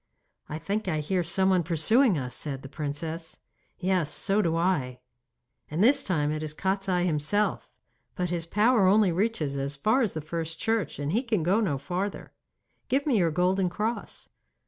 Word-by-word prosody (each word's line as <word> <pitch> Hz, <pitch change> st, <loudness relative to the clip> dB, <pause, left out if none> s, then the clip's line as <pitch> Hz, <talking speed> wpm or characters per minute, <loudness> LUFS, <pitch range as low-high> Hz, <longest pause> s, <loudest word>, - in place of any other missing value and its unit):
'I 155 Hz, -, -4 dB
think 205 Hz, +6 st, -3 dB
I 155 Hz, -, 0 dB
hear 180 Hz, +5 st, 0 dB
someone 190 Hz, +2 st, +2 dB
pursuing 180 Hz, -, +3 dB
us,' 125 Hz, -2 st, -4 dB
said 135 Hz, -3 st, -4 dB
the -, -, -7 dB
princess 155 Hz, +3 st, -5 dB, 0.4 s
'Yes, 180 Hz, -4 st, 0 dB
so 195 Hz, +7 st, +2 dB
do 165 Hz, -4 st, 0 dB
I.' 155 Hz, -8 st, 0 dB, 0.7 s
'And 160 Hz, +6 st, 0 dB
this 265 Hz, +5 st, +5 dB
time 150 Hz, -6 st, 0 dB
it 155 Hz, 0 st, -3 dB
is 155 Hz, -1 st, -5 dB
Kostiei 190 Hz, -1 st, 0 dB
himself. 175 Hz, +6 st, 0 dB, 0.5 s
But 180 Hz, -1 st, -2 dB
his 170 Hz, -1 st, -2 dB
power 210 Hz, +2 st, +3 dB
only 200 Hz, -1 st, +4 dB
reaches 170 Hz, -6 st, -1 dB
as 140 Hz, +1 st, -2 dB
far 215 Hz, -, +2 dB
as 220 Hz, -6 st, 0 dB
the 160 Hz, -, -3 dB
first 165 Hz, +1 st, -4 dB
church, 225 Hz, -7 st, -1 dB
and 145 Hz, +1 st, -3 dB
he 225 Hz, +7 st, +2 dB
can 225 Hz, -9 st, -1 dB
go 190 Hz, +6 st, +2 dB
no 160 Hz, -10 st, 0 dB
farther. 180 Hz, +8 st, -4 dB, 0.6 s
Give 275 Hz, +2 st, +1 dB
me 285 Hz, -5 st, +2 dB
your 170 Hz, -2 st, +3 dB
golden 180 Hz, +3 st, +1 dB
cross. 215 Hz, +6 st, -4 dB
180 Hz, 175 wpm, -27 LUFS, 155-205 Hz, 0.7 s, this